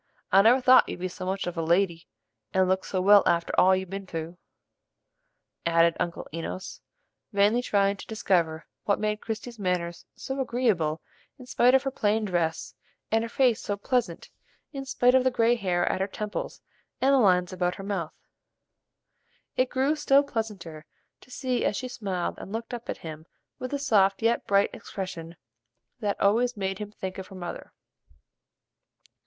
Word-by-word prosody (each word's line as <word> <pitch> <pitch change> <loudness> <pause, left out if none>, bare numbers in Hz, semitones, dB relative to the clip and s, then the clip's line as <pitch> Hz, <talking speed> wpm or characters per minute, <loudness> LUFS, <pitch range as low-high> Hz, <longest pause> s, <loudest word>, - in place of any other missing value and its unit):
I 195 - +7
never 235 +5 +5
thought 255 0 +6
you'd - - -5
be 185 - -2
so 185 0 -7
much 190 +1 -2
of 175 - -4
a 165 - -1
lady, 170 0 +1 0.5
and 190 0 +4
look 190 +1 0
so 185 - -2
well 200 +2 +7
after 170 0 +1
all 190 +1 +6
you've 190 -1 -4
ben 195 0 -6
through," 165 +1 -6 1.2
added 170 0 +3
Uncle 170 - -3
Enos, 165 +3 -6 0.5
vainly 205 +3 +3
trying 200 -4 +1
to - - -11
discover 170 -7 0 0.2
what 200 - +2
made 210 0 -1
Christie's 225 +1 -6
manners 180 -3 -2
so 265 +1 -5
agreeable 215 -12 0 0.3
in 255 - -12
spite 250 +1 +4
of 265 - +3
her 270 - -2
plain 215 -2 0
dress, 170 -4 -1 0.4
and 225 +1 +2
her 230 - -4
face 245 -2 +2
so 205 - -3
pleasant 220 -5 -2 0.4
in 270 -1 -5
spite 250 -2 +3
of 260 -1 +5
the 260 - +3
gray 235 -1 +3
hair 185 -6 0
at 185 - 0
her 190 - 0
temples 210 +1 -5 0.4
and 270 +1 +3
the 275 - +5
lines 180 -5 +3
about 180 -1 -1
her 195 - -8
mouth. 195 -5 -3 1.4
It 255 0 +1
grew 270 +4 +1
still 285 -2 +4
pleasanter 195 - -5 0.3
to - - -20
see 255 -1 -2
as 205 - 0
she 255 - -4
smiled 195 -7 -4
and - - -9
looked 225 +2 -5
up 240 -1 -7
at - - -3
him 155 0 -8 0.3
with 255 - -4
the 285 - -2
soft 210 -7 +2
yet 230 +1 +1
bright 200 0 +3
expression 170 -4 -7 0.6
that 205 -2 -2
always 230 +4 +2
made 195 -1 -2
him 210 -1 -6
think 190 -2 -6
of 190 - -7
her 195 - -12
mother. 175 -2 -7
200 Hz, 175 wpm, -27 LUFS, 180-235 Hz, 1.4 s, I